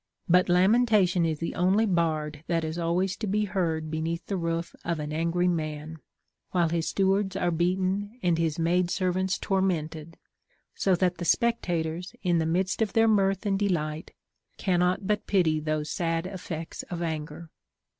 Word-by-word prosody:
'• - - -60 0.2
But 180 +1 +4
lamentation 190 -2 +4
is 160 -1 -1
the 165 - -3
only 190 +5 +3
bard 155 -5 -1
that 165 -1 0
is 160 +2 -3
always 180 +3 0
to 220 - -4
be 210 +2 +1
heard 165 -5 -1
beneath 165 +2 -3
the 200 - -3
roof" 170 -1 -2
of 170 -1 -1
the 150 - -4
angry 165 +4 0
man, 155 -2 -3 0.5
while 175 -3 +2
his 165 0 -1
stewards 195 0 +1
are 175 -2 +1
beaten 190 +5 0
and 170 -2 +2
his 160 -2 0
maid 175 +2 +1
servants 185 +1 0
tormented; 165 -5 -2 0.6
so 190 -2 +2
that 180 -1 0
the 175 - -3
spec 235 +5 +2
tators, 170 +1 -3
in 175 -2 +2
the 160 - 0
midst 185 +5 0
of 215 -3 0
their 225 0 +4
mirth 195 -1 +2
and 195 -1 +1
delight, 160 -6 -1 0.5
cannot 180 0 +1
but 210 +1 -1
pity 165 -6 +2
those 155 0 -2
sad 165 0 -1
effects 175 -4 -6
of 175 -2 -3
anger. 160 0 -5
175 Hz, 170 wpm, -27 LUFS, 160-190 Hz, 0.6 s, But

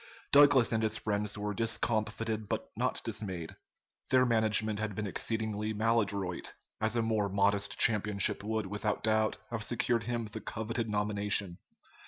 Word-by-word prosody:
Douglas 140 -4 +6
and 110 -1 +1
his 110 -1 +1
friends 105 -1 -2
were 105 0 -3
discomfited 110 -1 -1
but - - -3
not - - -1
dismayed. 100 -7 -5 0.5
Their 130 0 +4
management 110 -2 +3
had 105 -2 -3
been 105 - -3
exceedingly 110 +1 -2
maladroit, 100 -5 -1 0.3
as 110 +1 0
a 115 - +1
more 110 -3 0
modest 100 +1 +1
championship 105 -3 +1
would 110 0 -2
without 105 +1 -3
doubt 110 -1 +2
have 115 -2 -3
secured 115 0 -1
him 120 -1 -2
the 110 +1 -7
coveted 110 +2 -3
nomination. 105 -3 +1
110 Hz, 145 wpm, -31 LUFS, 105-110 Hz, 0.5 s, Douglas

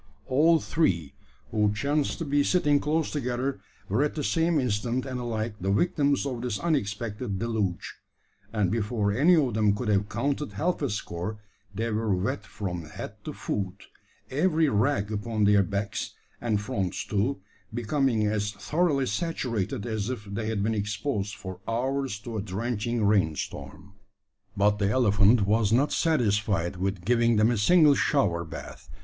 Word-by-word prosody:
All 160 +5 +4
three, 85 - 0 0.4
who 105 -2 +2
chanced 145 +6 0
to 165 - -4
be 145 0 +2
sitting 145 -4 +3
close 155 +2 0
together, 130 -1 -2 0.3
were 105 +7 +1
at 150 - 0
the 150 - -2
same 165 0 +2
instant, 125 +1 -1
and 130 -2 -4
alike, 115 -2 -2
the 95 +2 0
victims 145 - +2
of 125 -4 -3
this 120 -4 -2
unexpected 110 - -2
deluge; 105 -5 -2 0.5
and 105 -5 +1
before 105 -2 0
any 150 - +5
of 135 -7 +2
them 105 -2 +3
could 110 +1 -3
have 100 0 +2
counted 140 +4 -2
half 180 0 -1
a 140 - 0
score, 100 0 -4 0.4
they 115 +3 -1
were 110 -2 +1
wet 95 +1 -2
from 90 -2 -5
head 75 - -7
to - - -3
foot, 100 -1 -4 0.5
every 160 +2 +2
rag 105 -2 +1
upon 110 +1 -1
their 100 0 +5
backs, 100 +2 -3 0.3
and 110 -4 0
fronts 95 -3 -2
too, 110 +6 0 0.3
becoming 120 0 +1
as 105 0 -1
thoroughly 140 - +1
saturated 115 - -2
as 110 -2 -2
if 125 -4 -5
they 105 +2 -4
had 110 -3 -1
been 110 +2 +1
exposed 105 0 -2
for 95 -1 -8
hours 130 +1 -1
to 110 +2 -6
a - - -1
drenching 110 +3 -2
rain 95 -7 +3
storm! 95 +6 -7 0.6
But 105 +1 +3
the 100 -1 +2
elephant 105 -2 +4
was 105 0 +2
not 135 +6 +3
satisfied 105 - +1
with 95 -1 -2
giving 115 0 +3
them 110 +2 +4
a - - +1
single 155 - +6
shower 100 - +1
bath. 80 - -9
110 Hz, 160 wpm, -27 LUFS, 100-135 Hz, 0.6 s, single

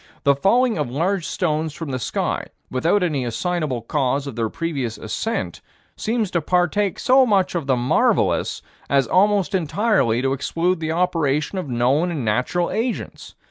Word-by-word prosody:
The 140 - +5
falling 225 - +2
of 145 -5 -1
large 170 +7 -1
stones 160 -4 -1
from 160 -4 -5
the 130 - -2
sky, - - -2 0.2
without 165 +10 +2
any 150 -7 0
assignable 130 +1 -2
cause 135 +2 0
of 140 -5 -6
their 115 -1 -1
previous 140 -8 -3
ascent, 225 - -3 0.3
seems 220 -3 -1
to 170 - 0
partake 180 +4 +1
so 260 +1 +5
much 200 -6 +2
of 165 -5 -3
the 130 - +3
marvelous 120 +1 +1 0.3
as 140 -1 +3
almost 200 +1 +2
entirely 160 - +1
to 135 0 +1
exclude 165 +6 -1
the 160 -1 -2
operation 165 -1 0
of 150 - -5
known 130 +8 +2
and 150 -8 -3
natural 125 +11 0
agents. 230 +2 -4
160 Hz, 160 wpm, -21 LUFS, 135-185 Hz, 0.3 s, The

